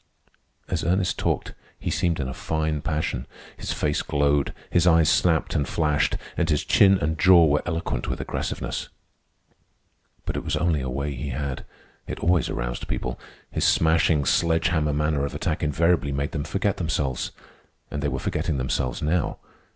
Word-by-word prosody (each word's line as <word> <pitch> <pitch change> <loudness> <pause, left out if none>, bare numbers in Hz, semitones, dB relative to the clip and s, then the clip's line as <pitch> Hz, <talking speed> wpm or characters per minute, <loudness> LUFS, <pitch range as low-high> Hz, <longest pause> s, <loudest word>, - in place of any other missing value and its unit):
As 85 -3 -2
Ernest 90 +2 +1
talked - - -1 0.2
he - - -3
seemed 85 -3 0
in 70 - -1
a 65 - -4
fine 80 +1 -2
passion; 75 -5 -2 0.3
his - - -5
face 75 -1 0
glowed, 70 -1 +1 0.2
his 90 0 +3
eyes 80 -2 +5
snapped 85 -2 +2
and 70 - 0
flashed, 75 -3 +1 0.2
and 85 -2 0
his 75 -2 +1
chin 95 -1 +5
and 80 -2 -2
jaw 90 -2 +7
were 75 -1 +2
eloquent 80 -8 -2
with - - -3
aggressiveness. - - -3 1.4
But - - -3
it - - -3
was - - -1
only 85 -4 +1
a 65 - -3
way 70 +3 -2
he 70 +2 -5
had. 70 0 -4 0.4
It - - -5
always 90 0 +2
aroused - - -3
people. - - -3 0.3
His - - -1
smashing, 80 -2 +3
sledge 80 +1 +2
hammer 80 -3 +1
manner 75 -1 0
of 70 - -3
attack - - -2
invariably 80 0 +2
made 70 +1 -2
them 75 -3 -3
forget 100 0 -1
themselves. 75 -6 -1 0.6
And 75 - -3
they 75 - 0
were 65 -2 -2
forgetting 70 +2 -1
themselves 65 -1 -1
now. 80 +2 0
75 Hz, 170 wpm, -25 LUFS, 70-85 Hz, 1.4 s, jaw